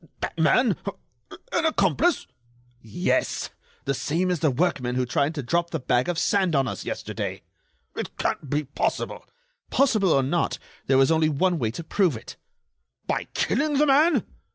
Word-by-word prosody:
that - - -4
man... - - +3 0.8
an - - +2
accomplice?" 330 +2 +2 0.6
"Yes, 110 -3 -1 0.3
the 140 - +1
same 170 +7 0
as 175 - 0
the 155 - +3
workmen 130 -3 0
who 130 0 +1
tried 140 +5 0
to 145 - -3
drop 170 +7 0
the 160 - -3
bag 125 +2 +1
of 175 - -1
sand 190 -2 +2
on 135 -1 +2
us - - -5
yesterday." - - -4 0.5
"It - - -5
can't 145 - -2
be 150 +2 0
possible!" 140 0 -2 0.5
"Possible 220 -9 +3
or 135 - +4
not, 160 +5 0 0.3
there 135 - +4
was 135 +3 +4
only 160 -1 +3
one 170 +4 +1
way 115 -4 0
to 125 +9 -6
prove 170 - +1
it." - - -10 0.7
"By - - -1
killing 290 +5 +1
the 300 - +4
man?" 300 +4 +4
160 Hz, 165 wpm, -25 LUFS, 135-190 Hz, 0.8 s, or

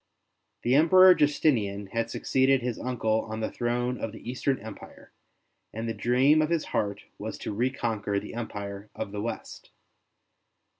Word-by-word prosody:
The 120 - +2
Emperor 185 +6 +8
Justinian 125 - +1
had 115 0 -1
succeeded 130 +1 +2
his 125 -2 -3
uncle 110 -3 0
on 110 0 -4
the 110 - -2
throne 120 +1 -1
of 115 - -3
the - - -11
Eastern 130 +1 0
Empire, 110 0 -12 0.6
and 115 +2 -5
the 115 - -1
dream 130 +7 +3
of 155 - 0
his 170 -2 0
heart 100 -1 -1 0.2
was - - -5
to - - -5
reconquer 110 -3 -1
the 105 - -9
Empire 100 -3 -6
of 110 -3 -5
the 105 0 -4
West. 115 - -6
120 Hz, 155 wpm, -27 LUFS, 110-130 Hz, 0.6 s, Emperor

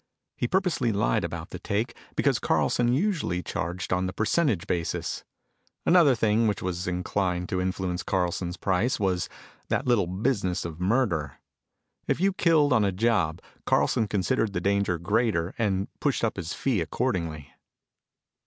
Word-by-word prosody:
He 120 - -1
purposely 180 -8 +1
lied 100 - +1
about - - -5
the - - -6
take 105 +3 -2 0.2
because - - +2
Carlson 120 0 +2
usually 145 - 0
charged 90 +1 -3
on 90 0 +1
the 90 - -4
percentage 110 - +1
basis. 85 -2 -2 0.6
Another 170 -7 +6
thing 110 0 +2
which 105 -2 0
was 90 0 -3
inclined 90 0 -1
to 90 - 0
influence 95 -1 -2
Carlson's 90 -1 -1
price 100 +7 0
was 95 -3 0 0.4
that - - 0
little 120 -8 +3
business 95 -2 -1
of 85 -1 -6
murder. 90 - +1 0.7
If - - +1
you 195 +2 +2
killed 155 -6 +3
on 110 -4 +4
a 100 - +2
job 95 -5 +1 0.2
Carlson 110 - +2
considered 100 +1 0
the 90 - 0
danger 100 -1 +1
greater 100 -1 0
and 100 -3 0
pushed 140 -5 0
up 115 - +1
his 85 -3 -4
fee 125 -9 0
accordingly. 85 - -2
100 Hz, 150 wpm, -27 LUFS, 90-120 Hz, 0.7 s, Another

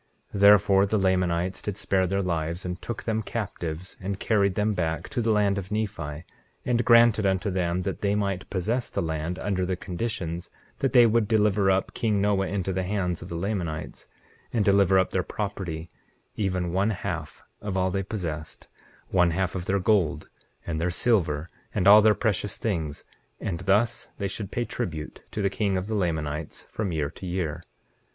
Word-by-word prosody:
19:15 100 - -3
Therefore 100 -1 +6
the 110 - +1
Lamanites 90 -2 +1
did 105 -2 -4
spare 95 -3 +1
their 100 +2 0
lives, 85 0 -2
and 90 0 -4
took 120 - -5
them 110 -1 0
captives 90 -6 -5
and 100 +1 -3
carried 100 -4 +2
them 105 +1 +1
back 80 -3 -2
to 130 -4 -1
the 115 - 0
land 100 -2 +3
of 95 +1 -8
Nephi, 90 -8 -3 0.4
and 120 -1 +2
granted 115 -3 +6
unto 95 +1 0
them 90 -1 0
that 95 - -3
they 100 0 +1
might 100 -3 -2
possess 110 +7 -1
the - - -2
land, 80 +2 -2
under 95 -3 -1
the 90 0 0
conditions 90 -2 -4 0.3
that 135 - 0
they 120 -2 +8
would 115 -1 +3
deliver 105 -2 +3
up 95 0 +1
king 105 -3 +1
Noah 100 -1 +2
into 95 -1 -2
the 95 - 0
hands 90 -2 -1
of - - -8
the 85 - -5
Lamanites, 85 -4 -3 0.4
and 110 -4 +1
deliver 100 -1 +5
up 95 - +2
their 95 - +1
property, 90 -5 -4 0.5
even 90 -4 -1
one 100 +3 +2
half 105 - -4 0.2
of 100 -2 -3
all 95 0 +1
they 95 - 0
possessed, 85 -6 -5 0.4
one 90 -2 +4
half 95 +2 -1
of 90 -2 -4
their 100 +1 +1
gold, 95 -4 +1 0.4
and 80 -2 -2
their 90 - +1
silver, 85 -6 +1 0.3
and 90 - +2
all 105 +1 +10
their 105 0 +5
precious 105 -2 -1
things, 80 -9 -3 0.3
and 85 -4 -3
thus 100 +5 +1
they 100 - -1
should 100 0 -5
pay 120 - -2
tribute 80 -13 -5
to 105 - -3
the 100 - +3
king 100 -2 0
of 90 - -2
the 110 - -4
Lamanites 80 -6 -2
from 105 -4 -2
year 75 -3 -1
to 95 - -8
year. 85 -4 -2
95 Hz, 190 wpm, -26 LUFS, 90-105 Hz, 0.5 s, all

